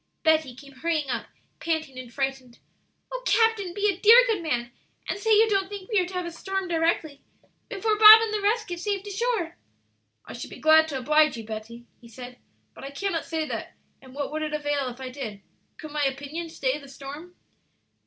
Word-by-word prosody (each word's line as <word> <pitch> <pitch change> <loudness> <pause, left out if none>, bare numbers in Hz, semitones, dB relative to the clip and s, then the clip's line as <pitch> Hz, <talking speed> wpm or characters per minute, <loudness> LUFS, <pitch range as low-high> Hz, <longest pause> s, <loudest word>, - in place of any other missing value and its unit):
Betty 315 -6 +2
came 275 +2 -14
hurrying 300 0 -2
up, 240 - -3 0.3
panting 315 -5 -3
and 250 -2 -10
frightened. 265 -2 -4 0.5
"O - - -4
captain, 450 -6 +2
be 410 +3 0
a 390 -3 -1
dear, 465 +5 +8
good 445 -6 -1
man, 240 -7 -2 0.4
and - - -3
say 445 - -3
you 440 +1 +6
don't 390 -2 0
think 405 0 -9
we 420 - +3
are 360 - 0
to 370 - -10
have 360 -1 -2
a 345 - -5
storm 385 +3 -4
directly 325 -3 -1 0.5
before 425 +1 -1
Bob 435 0 +11
and 445 -1 -2
the 420 - -1
rest 435 +2 +1
get 350 -2 -5
safe 400 0 -2
to 410 - -7
shore!" 400 -5 -2 0.7
"I - - -9
should - - -7
be - - -10
glad 315 0 +5
to 285 -4 -4
oblige 300 +2 +3
you, 225 - -7
Betty," 225 +2 -8
he 235 - -16
said, 245 +2 -11 0.3
"but - - -13
I 275 - -6
cannot 330 +3 -3
say 320 -1 -2
that; - - -6 0.3
and 260 0 -15
what 285 0 -4
would 310 +1 -3
it 305 -1 -3
avail 290 -3 -1
if 245 +1 -11
I 260 -1 -6
did? 220 -7 -7 0.3
Could 310 - -9
my 295 0 -1
opinion 285 +5 -4
stay 275 -2 -2
the 280 -2 -14
storm?" 285 +6 -10
315 Hz, 215 wpm, -25 LUFS, 270-395 Hz, 0.7 s, Bob